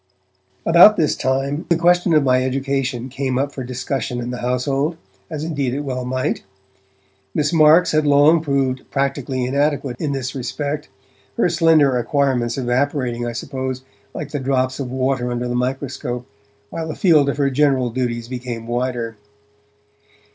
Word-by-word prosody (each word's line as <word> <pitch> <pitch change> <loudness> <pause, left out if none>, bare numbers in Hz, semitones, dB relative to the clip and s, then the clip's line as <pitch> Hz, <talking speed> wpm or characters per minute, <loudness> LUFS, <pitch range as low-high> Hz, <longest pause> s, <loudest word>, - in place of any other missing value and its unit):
About 175 +6 +7
this 155 - +2
time, 135 +3 -1
the 170 - +4
question 175 0 +3
of 150 - +4
my 130 -1 +3
education 130 -1 -2
came 130 -1 -2
up 140 +2 -1
for 135 - -6
discussion 125 0 -3
in 120 0 -4
the 125 - -5
household, 135 +6 -1 0.3
as 155 -1 -5
indeed 140 -6 -2
it 145 - -2
well 130 -3 -4
might. 130 +1 -1 0.9
Miss 150 +2 +1
Marks 160 +2 +6
had 155 -1 +2
long 145 +3 +5
proved 135 -3 0
practically 135 -2 -1
inadequate 140 -1 0
in 150 - -1
this 130 -2 -3
respect, 145 +3 -4 0.5
her 230 - +3
slender 160 -6 +4
acquirements 125 -2 0
evaporating, 125 -1 -1
I 120 - -4
suppose, 130 +1 -4 0.3
like 145 -1 -6
the 145 - -2
drops 130 0 0
of 135 -3 -3
water 130 -1 0
under 120 0 -2
the 120 - -2
microscope, 125 -1 -3 0.5
while 165 -1 -4
the 155 - -5
field 155 -7 +4
of 140 - -2
her 140 -1 +1
general 135 -3 +2
duties 120 -1 -2
became 120 -2 -6
wider. 120 -2 -2
135 Hz, 155 wpm, -20 LUFS, 125-145 Hz, 0.9 s, About